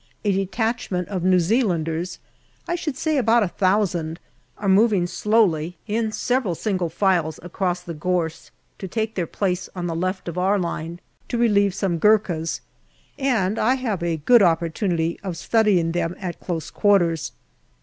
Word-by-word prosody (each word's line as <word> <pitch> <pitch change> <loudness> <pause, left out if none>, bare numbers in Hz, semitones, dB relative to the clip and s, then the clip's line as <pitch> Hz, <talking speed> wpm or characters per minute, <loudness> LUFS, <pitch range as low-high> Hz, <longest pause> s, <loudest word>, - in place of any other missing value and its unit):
A 205 - +3
detach 220 +5 -1
ment 180 -2 -2
of 185 -4 -3
New 185 0 +4
Zealanders, 175 -4 0 0.5
I - - -1
should 315 -6 -3
say 310 0 0
about 230 -1 +4
a - - +1
thousand, 175 -4 0 0.4
are 205 - -4
moving 195 -1 +4
slowly 180 -4 +1
in 220 0 -1
several 245 -5 0
single 185 -3 -1
files 170 -3 +1
across 180 0 -2
the 175 -1 -7
gorse 165 0 -2 0.3
to 190 - -5
MAY - - -17
75 - - -16
take 220 -1 -1
their 175 -5 -2
place 180 -1 -2
on 180 -1 -3
the 165 -1 -2
left 185 +3 -2
of 170 +1 -3
our 195 +3 +2
line 170 -2 -4 0.3
to 240 - -1
relieve 200 -5 +3
some 180 -4 -1
Gurkhas, 180 -5 +2 0.6
and 225 -7 +1
I 250 +4 +3
have 225 -8 -2
a 170 -1 -1
good 230 +10 +5
opportunity 170 -1 +1
of 185 -4 -5
studying 195 -5 +2
them 175 0 -1
at 180 -3 -5
close 165 -3 -4
quarters. 175 -6 +2
185 Hz, 170 wpm, -23 LUFS, 170-215 Hz, 0.6 s, good